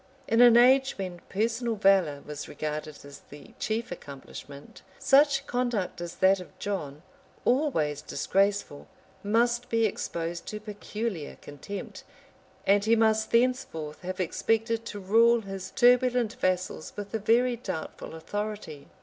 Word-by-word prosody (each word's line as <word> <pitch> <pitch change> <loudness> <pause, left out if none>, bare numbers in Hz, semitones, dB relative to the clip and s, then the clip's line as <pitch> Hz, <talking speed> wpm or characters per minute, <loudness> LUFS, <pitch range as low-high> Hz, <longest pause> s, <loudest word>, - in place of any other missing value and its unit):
] - - -31
In 230 +2 +3
an 240 -1 +8
age 265 +2 +5
when 185 -3 -5
personal 230 +3 -1
valor 190 -8 +3
was 150 -1 -7
regarded 150 0 -5
as 140 0 -11
the 145 - -13
chief 220 -1 -2
accomplishment, 140 -2 -10 0.2
such 275 0 +4
conduct 240 -9 -2
as 175 0 -6
that 190 +1 +4
of 180 +1 -12
John, 155 -8 -4 0.4
always 200 - +1
disgraceful, 195 +1 -1 0.4
must 240 +3 +1
be 230 -1 +2
exposed 170 -4 -3
to 210 - -5
peculiar 210 -4 -5
contempt; 145 +8 -8 0.6
and 200 +1 +4
he 225 +2 +4
must 220 -1 +2
thenceforth 230 - 0
have 185 +1 -5
expected 225 +5 0
to 205 - -6
rule 230 +4 +4
his 195 -2 -7
turbulent 245 -2 +3
vassals 185 -3 -2
with 205 0 -7
a 225 - 0
very 240 +4 +3
doubtful 165 -8 -6
authority. 205 -4 -5
205 Hz, 135 wpm, -28 LUFS, 170-235 Hz, 0.6 s, an